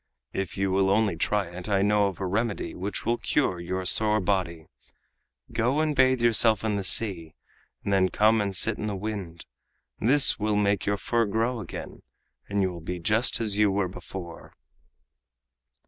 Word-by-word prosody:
If 95 Hz, 0 st, -4 dB
you 95 Hz, 0 st, 0 dB
will 95 Hz, 0 st, +2 dB
only 100 Hz, -2 st, +2 dB
try 100 Hz, +4 st, 0 dB
it, 90 Hz, +3 st, -8 dB
I 100 Hz, -1 st, +2 dB
know 105 Hz, 0 st, +3 dB
of 95 Hz, -, -6 dB
a 95 Hz, -, -3 dB
remedy 100 Hz, -2 st, -2 dB
which 95 Hz, +2 st, -5 dB
will 120 Hz, +1 st, 0 dB
cure 95 Hz, -12 st, 0 dB
your 90 Hz, +2 st, -4 dB
sore 105 Hz, +3 st, +3 dB
body. 90 Hz, -5 st, -2 dB, 0.9 s
Go 125 Hz, +6 st, +1 dB
and 155 Hz, -1 st, 0 dB
bathe 130 Hz, -2 st, +3 dB
yourself 115 Hz, -1 st, +4 dB
in 110 Hz, -2 st, 0 dB
the 100 Hz, -, -2 dB
sea, 90 Hz, -5 st, +1 dB, 0.5 s
and 100 Hz, -, -1 dB
then 95 Hz, -1 st, +3 dB
come 110 Hz, +1 st, +3 dB
and 100 Hz, -2 st, -2 dB
sit 110 Hz, +3 st, +3 dB
in 105 Hz, -, -3 dB
the 105 Hz, -, -3 dB
wind. 95 Hz, -4 st, -6 dB, 0.5 s
This 135 Hz, +3 st, +4 dB
will 105 Hz, 0 st, 0 dB
make 100 Hz, -1 st, 0 dB
your 100 Hz, 0 st, +1 dB
fur 115 Hz, +4 st, 0 dB
grow 115 Hz, +4 st, -1 dB
again, 100 Hz, -, -8 dB, 0.5 s
and 100 Hz, -1 st, 0 dB
you 95 Hz, -, 0 dB
will 85 Hz, -, -9 dB
be 90 Hz, +2 st, -5 dB
just 110 Hz, +8 st, +1 dB
as 105 Hz, -3 st, -1 dB
you 105 Hz, -1 st, +4 dB
were 95 Hz, -1 st, 0 dB
before." 90 Hz, -1 st, -10 dB
100 Hz, 180 wpm, -26 LUFS, 95-110 Hz, 0.9 s, yourself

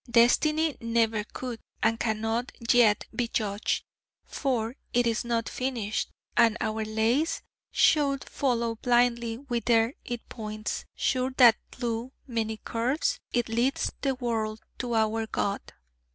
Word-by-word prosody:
Destiny 300 Hz, +7 st, +4 dB
never 230 Hz, -2 st, +1 dB
could, 240 Hz, +1 st, -6 dB, 0.2 s
and 225 Hz, +1 st, +2 dB
cannot 225 Hz, +2 st, -1 dB, 0.2 s
yet, 225 Hz, -4 st, +5 dB
be 240 Hz, -, 0 dB
judged, 210 Hz, -2 st, -1 dB, 0.4 s
for 245 Hz, -4 st, -1 dB, 0.2 s
it 245 Hz, 0 st, +3 dB
is 230 Hz, -1 st, +1 dB
not 235 Hz, -1 st, -1 dB
finished: 240 Hz, -5 st, -2 dB, 0.3 s
and 230 Hz, -1 st, +5 dB
our 220 Hz, 0 st, -1 dB
lace 225 Hz, +8 st, +1 dB, 0.3 s
should 280 Hz, -3 st, +3 dB
follow 235 Hz, -4 st, 0 dB
blindly 240 Hz, -1 st, +2 dB
whither 235 Hz, -2 st, +1 dB
it 240 Hz, -1 st, -6 dB
points, 215 Hz, -1 st, -5 dB
sure 255 Hz, 0 st, +1 dB
that 240 Hz, -4 st, +8 dB
thlough 240 Hz, +1 st, -3 dB
many 225 Hz, -3 st, -2 dB
curves 260 Hz, -, -1 dB
it 240 Hz, -1 st, +1 dB
leads 235 Hz, +4 st, +1 dB
the 270 Hz, -2 st, +1 dB
world 225 Hz, -3 st, -2 dB, 0.2 s
to 240 Hz, -2 st, -2 dB
our 220 Hz, 0 st, +1 dB
God.' 200 Hz, -2 st, -2 dB
235 Hz, 125 wpm, -28 LUFS, 225-250 Hz, 0.4 s, that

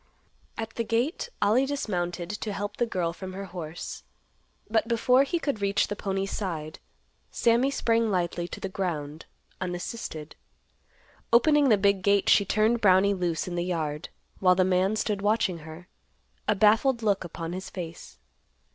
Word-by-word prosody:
At 225 Hz, 0 st, -4 dB
the 230 Hz, -, +1 dB
gate, 245 Hz, -, -1 dB
Ollie 250 Hz, +6 st, +3 dB
dismounted 180 Hz, -10 st, -2 dB
to 210 Hz, 0 st, -4 dB
help 205 Hz, +1 st, -4 dB
the 240 Hz, -, +1 dB
girl 175 Hz, -6 st, -1 dB
from 185 Hz, +1 st, -8 dB
her 195 Hz, +1 st, -5 dB
horse. 175 Hz, -3 st, -7 dB, 0.7 s
But 220 Hz, 0 st, +1 dB
before 250 Hz, +2 st, +4 dB
he 280 Hz, +5 st, 0 dB
could 280 Hz, -10 st, -2 dB
reach 200 Hz, 0 st, +1 dB
the 205 Hz, -, -2 dB
pony's 195 Hz, -1 st, -2 dB
side, 160 Hz, -6 st, -4 dB, 0.5 s
Sammy 235 Hz, +3 st, +2 dB
sprang 230 Hz, -4 st, +1 dB
lightly 175 Hz, -2 st, -1 dB
to -, -, -8 dB
the -, -, -3 dB
ground, 165 Hz, -5 st, -4 dB, 0.3 s
unassisted. 175 Hz, -3 st, -5 dB, 1.0 s
Opening 285 Hz, +4 st, +5 dB
the 215 Hz, -, +6 dB
big 200 Hz, -1 st, +2 dB
gate, 200 Hz, +1 st, +3 dB
she 200 Hz, -, +5 dB
turned 220 Hz, +4 st, +2 dB
Brownie 195 Hz, 0 st, +5 dB
loose 175 Hz, -3 st, -1 dB
in 180 Hz, -, -4 dB
the 175 Hz, 0 st, -1 dB
yard, 160 Hz, -4 st, -3 dB, 0.3 s
while 185 Hz, -1 st, +5 dB
the 185 Hz, -, +3 dB
man 185 Hz, +3 st, +2 dB
stood 210 Hz, -2 st, -1 dB
watching 205 Hz, -4 st, +1 dB
her, 160 Hz, +3 st, -11 dB, 0.6 s
a 210 Hz, -, +3 dB
baffled 220 Hz, +4 st, +3 dB
look 200 Hz, -3 st, +1 dB
upon 165 Hz, 0 st, -6 dB
his 190 Hz, +1 st, -6 dB
face. 170 Hz, -3 st, -8 dB
195 Hz, 160 wpm, -27 LUFS, 175-225 Hz, 1.0 s, the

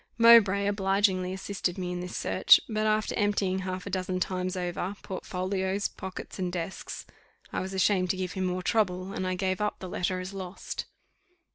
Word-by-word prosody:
Mowbray 225 Hz, -4 st, +7 dB
obligingly 195 Hz, -2 st, +2 dB
assisted 190 Hz, -1 st, -3 dB
me 180 Hz, -1 st, -3 dB
in 180 Hz, -, -3 dB
this 180 Hz, 0 st, -5 dB
search; -, -, +6 dB
but 215 Hz, -1 st, 0 dB
after 215 Hz, 0 st, +1 dB
emptying 200 Hz, -3 st, +1 dB
half 185 Hz, 0 st, -4 dB
a 200 Hz, -, -5 dB
dozen 185 Hz, 0 st, -1 dB
times 185 Hz, 0 st, -2 dB
over 180 Hz, +2 st, -2 dB
portfolios, 190 Hz, +1 st, -2 dB
pockets, 190 Hz, 0 st, -8 dB
and 180 Hz, -1 st, -1 dB
desks, 175 Hz, +1 st, -5 dB, 0.5 s
I -, -, 0 dB
was 190 Hz, +1 st, -5 dB
ashamed 185 Hz, -1 st, +2 dB
to 185 Hz, -, +1 dB
give 185 Hz, -1 st, -2 dB
him 190 Hz, -1 st, -2 dB
more 180 Hz, 0 st, -1 dB
trouble, 185 Hz, -3 st, 0 dB
and 185 Hz, -, -2 dB
I 185 Hz, -, 0 dB
gave 185 Hz, +1 st, -1 dB
up 210 Hz, -, 0 dB
the 185 Hz, -, -7 dB
letter 185 Hz, +1 st, -1 dB
as 185 Hz, +2 st, -6 dB
lost. 190 Hz, -1 st, -5 dB
185 Hz, 180 wpm, -28 LUFS, 185-200 Hz, 0.5 s, Mowbray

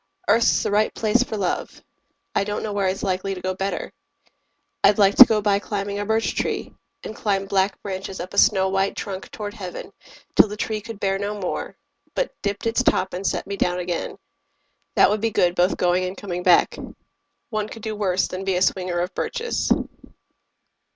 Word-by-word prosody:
Earth's 230 Hz, 0 st, +4 dB
the -, -, -1 dB
right 210 Hz, +1 st, +2 dB
place 225 Hz, +2 st, +2 dB
for 225 Hz, -3 st, -2 dB
love: 190 Hz, -3 st, -3 dB, 0.5 s
I 200 Hz, -, +2 dB
don't 205 Hz, +1 st, -3 dB
know 210 Hz, -, -3 dB
where 200 Hz, -1 st, +1 dB
it's 185 Hz, +1 st, -2 dB
likely 190 Hz, 0 st, -1 dB
to -, -, -7 dB
go 185 Hz, +1 st, -1 dB
better. 195 Hz, +1 st, -3 dB, 0.9 s
I'd 200 Hz, 0 st, +5 dB
like 200 Hz, -1 st, +5 dB
to 255 Hz, -, +12 dB
go 215 Hz, -2 st, +1 dB
by 200 Hz, -1 st, +3 dB
climbing 200 Hz, 0 st, -3 dB
a 205 Hz, -, -2 dB
birch 220 Hz, +1 st, +1 dB
tree, -, -, -2 dB, 0.3 s
And 215 Hz, -, -7 dB
climb 195 Hz, -2 st, 0 dB
black 195 Hz, 0 st, 0 dB
branches 190 Hz, -1 st, -5 dB
up 180 Hz, +2 st, -6 dB
a 200 Hz, -, +3 dB
snow 190 Hz, -3 st, +4 dB
white 195 Hz, +1 st, 0 dB
trunk 195 Hz, -2 st, -6 dB
Toward 205 Hz, -1 st, -6 dB
heaven, 190 Hz, -5 st, -8 dB, 0.4 s
till -, -, +7 dB
the 210 Hz, +1 st, -7 dB
tree 215 Hz, 0 st, -2 dB
could 225 Hz, -1 st, -9 dB
bear 195 Hz, -1 st, 0 dB
no 205 Hz, +1 st, -3 dB
more, 185 Hz, -, -4 dB, 0.4 s
But -, -, -1 dB
dipped 200 Hz, +1 st, -3 dB
its 230 Hz, +2 st, +2 dB
top 190 Hz, -6 st, +1 dB
and 185 Hz, +2 st, -2 dB
set -, -, -1 dB
me 200 Hz, 0 st, -5 dB
down 180 Hz, -1 st, +1 dB
again. 175 Hz, -1 st, -3 dB, 0.8 s
That -, -, +6 dB
would 210 Hz, 0 st, 0 dB
be 225 Hz, -, +1 dB
good 175 Hz, -4 st, +2 dB
both 180 Hz, +1 st, +2 dB
going 180 Hz, +1 st, +2 dB
and 185 Hz, +1 st, -5 dB
coming 180 Hz, -3 st, -4 dB
back. 180 Hz, -1 st, +4 dB, 0.7 s
One 215 Hz, -1 st, -1 dB
could 225 Hz, -, -10 dB
do 220 Hz, -1 st, -3 dB
worse 190 Hz, -3 st, +1 dB
than 185 Hz, +1 st, -5 dB
be 195 Hz, -1 st, 0 dB
a 180 Hz, -, +2 dB
swinger 180 Hz, -2 st, 0 dB
of 180 Hz, +2 st, -3 dB
birches. 475 Hz, -1 st, -2 dB
200 Hz, 200 wpm, -23 LUFS, 185-210 Hz, 0.9 s, to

